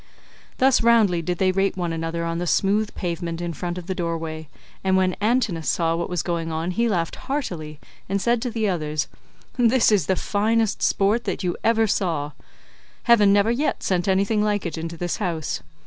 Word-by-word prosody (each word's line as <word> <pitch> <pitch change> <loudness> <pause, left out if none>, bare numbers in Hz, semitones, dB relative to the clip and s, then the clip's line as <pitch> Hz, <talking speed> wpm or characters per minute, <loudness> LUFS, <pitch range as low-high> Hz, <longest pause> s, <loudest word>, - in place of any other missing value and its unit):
Thus 260 0 +4
roundly 220 -7 +4
did 175 +2 -2
they 185 0 +2
rate 195 +1 0
one 175 -2 -2
another 165 +1 -3
on 165 0 -2
the 175 - -2
smooth 205 +6 +1
pavement 170 -2 -3
in 175 -1 -3
front 175 +2 -4
of 180 - -6
the 190 - -2
doorway,149 165 -3 -4 0.3
and 190 0 +3
when 185 -1 +2
Antinous 210 -8 +1
saw 165 -1 +1
what 170 0 -3
was 180 -2 -1
going 170 -2 -2
on 160 +3 -2
he 235 +6 +1
laughed 170 -5 -1
heartily 170 - -4 0.3
and 200 +1 0
said 235 +3 +1
to 250 - -2
the 225 -2 -1
others, 155 -5 -1 0.5
"This 245 -1 +4
is 195 -8 +2
the 190 - +2
finest 220 +3 0
sport 210 +4 +2
that 195 - -3
you 175 -1 -1
ever 225 -1 +3
saw; 165 -8 -1 0.7
heaven 210 -4 +5
never 205 +3 +4
yet 275 +6 -1
sent 185 0 0
anything 195 +3 +2
like 205 -2 0
it 170 - -3
into 165 +1 -5
this 175 +1 -2
house. 160 - -2
185 Hz, 195 wpm, -23 LUFS, 165-215 Hz, 0.7 s, heaven